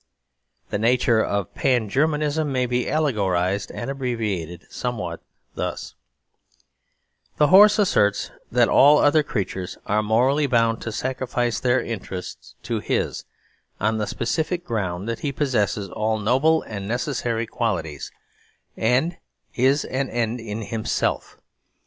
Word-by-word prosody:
The 105 Hz, -, -1 dB
nature 115 Hz, 0 st, +3 dB
of 100 Hz, -3 st, -2 dB
Pan 125 Hz, -5 st, +1 dB
Germanism 150 Hz, +4 st, 0 dB
may 130 Hz, -1 st, +1 dB
be 125 Hz, 0 st, -1 dB
allegorised 100 Hz, -, 0 dB
and 120 Hz, -, -6 dB
abbreviated 105 Hz, -11 st, -3 dB
somewhat 100 Hz, -9 st, -4 dB, 0.3 s
thus: -, -, -4 dB, 1.4 s
The 150 Hz, -, +4 dB
horse 205 Hz, +3 st, +8 dB
asserts 105 Hz, -, +2 dB, 0.2 s
that -, -, +4 dB
all 145 Hz, +2 st, +6 dB
other 150 Hz, +2 st, +4 dB
creatures 95 Hz, -8 st, -4 dB
are 105 Hz, +1 st, +1 dB
morally 130 Hz, +7 st, +2 dB
bound 115 Hz, -3 st, +2 dB
to 110 Hz, -, -4 dB
sacrifice 120 Hz, -1 st, -2 dB
their 125 Hz, 0 st, +2 dB
interests 95 Hz, -6 st, -7 dB
to -, -, -2 dB
his, -, -, -2 dB, 0.5 s
on 110 Hz, +2 st, 0 dB
the 105 Hz, -, -1 dB
specific 165 Hz, +8 st, -2 dB
ground 95 Hz, -4 st, -3 dB
that 115 Hz, -1 st, -3 dB
he 140 Hz, -, -2 dB
possesses 120 Hz, -7 st, 0 dB
all 110 Hz, +1 st, 0 dB
noble 135 Hz, +10 st, +2 dB
and 100 Hz, -3 st, -6 dB
necessary 120 Hz, -1 st, -1 dB
qualities, 85 Hz, -, -3 dB, 0.6 s
and 125 Hz, +10 st, +1 dB, 0.4 s
is 135 Hz, +4 st, +2 dB
an 130 Hz, 0 st, -2 dB
end 120 Hz, 0 st, -1 dB
in 110 Hz, -1 st, -5 dB
himself. 110 Hz, +1 st, -2 dB
115 Hz, 125 wpm, -23 LUFS, 105-135 Hz, 1.4 s, horse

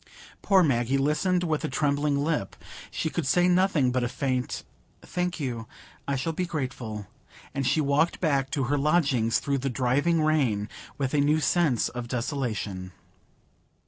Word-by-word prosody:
Poor 190 Hz, -2 st, +4 dB
Maggie 130 Hz, -3 st, +2 dB
listened 150 Hz, +6 st, +1 dB
with 155 Hz, -3 st, -1 dB
a -, -, 0 dB
trembling 145 Hz, +1 st, +1 dB
lip; 150 Hz, -11 st, -1 dB, 0.3 s
she -, -, -2 dB
could 160 Hz, -2 st, -2 dB
say 175 Hz, +5 st, +4 dB
nothing 180 Hz, -8 st, +3 dB
but 125 Hz, 0 st, 0 dB
a 120 Hz, -, 0 dB
faint 130 Hz, -1 st, -2 dB, 0.4 s
"Thank 180 Hz, -1 st, -2 dB
you, 120 Hz, -5 st, -4 dB, 0.4 s
I 140 Hz, -, 0 dB
shall 150 Hz, +5 st, -2 dB
be 180 Hz, +3 st, -2 dB
grateful"; 125 Hz, -, -4 dB, 0.5 s
and 135 Hz, -2 st, -1 dB
she 155 Hz, +4 st, +2 dB
walked 150 Hz, +4 st, +1 dB
back 140 Hz, -5 st, +1 dB
to 135 Hz, 0 st, -1 dB
her 140 Hz, +3 st, 0 dB
lodgings, 140 Hz, -7 st, +2 dB
through 140 Hz, -1 st, -1 dB
the 135 Hz, +2 st, -1 dB
driving 140 Hz, +7 st, +1 dB
rain, 130 Hz, -10 st, +1 dB, 0.3 s
with 135 Hz, -1 st, -2 dB
a 145 Hz, -, +3 dB
new 150 Hz, +2 st, +3 dB
sense 155 Hz, -, +2 dB
of 120 Hz, -1 st, -6 dB
desolation. 115 Hz, -, -3 dB
140 Hz, 160 wpm, -27 LUFS, 125-155 Hz, 0.5 s, Poor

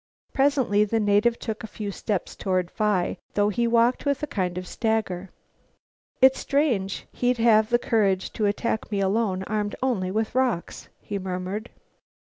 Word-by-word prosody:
Presently 265 Hz, -7 st, +3 dB
the 225 Hz, +2 st, 0 dB
native 210 Hz, +3 st, +3 dB
took 220 Hz, -1 st, -5 dB
a -, -, -5 dB
few 210 Hz, -1 st, -5 dB
steps 200 Hz, -1 st, -3 dB
forward. 185 Hz, -2 st, -1 dB
Phi 210 Hz, -4 st, 0 dB, 0.2 s
thought 205 Hz, 0 st, +3 dB
he 235 Hz, +4 st, +1 dB
walked 235 Hz, +2 st, +3 dB
with 285 Hz, 0 st, -1 dB
a -, -, +3 dB
kind 185 Hz, -10 st, -2 dB
of 180 Hz, -, -4 dB
stagger. 195 Hz, -3 st, -2 dB, 0.9 s
"It's 265 Hz, 0 st, +6 dB
strange 245 Hz, -10 st, 0 dB
he'd 245 Hz, 0 st, 0 dB
have 220 Hz, -2 st, +4 dB
the 240 Hz, -, +4 dB
courage 200 Hz, -6 st, +1 dB
to 215 Hz, -2 st, 0 dB
attack 220 Hz, +2 st, -2 dB
me 200 Hz, -, 0 dB
alone, 195 Hz, -1 st, 0 dB
armed 205 Hz, 0 st, -2 dB
only 210 Hz, -8 st, 0 dB
with 220 Hz, +3 st, -1 dB
rocks," 250 Hz, -8 st, -1 dB
he 200 Hz, -, -4 dB
murmured. 190 Hz, +4 st, -4 dB
215 Hz, 160 wpm, -25 LUFS, 195-235 Hz, 0.9 s, It's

